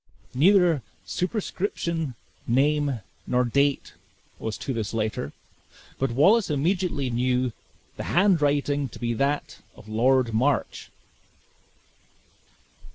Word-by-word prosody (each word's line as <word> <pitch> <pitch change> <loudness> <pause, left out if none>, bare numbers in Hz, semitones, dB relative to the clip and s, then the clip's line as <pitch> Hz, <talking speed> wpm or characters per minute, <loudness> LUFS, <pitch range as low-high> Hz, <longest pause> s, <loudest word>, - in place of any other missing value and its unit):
Neither 175 +1 +4 0.2
superscription, 175 - -2 0.3
name, 140 0 +1 0.3
nor 125 0 +2
date, 140 +3 +1 0.5
was 110 -1 -4
to 135 - -4
this 110 -1 -3
letter; 110 -10 -2 0.7
but 135 - +1
Wallace 190 - +4
immediately 155 -2 0
knew 125 +1 +1 0.5
the - - -5
handwriting 145 -7 +2
to - - -11
be 120 -1 -1
that 140 +5 -1 0.2
of - - -15
Lord 120 +2 +2
March. 130 +4 0
140 Hz, 95 wpm, -25 LUFS, 120-160 Hz, 0.7 s, Neither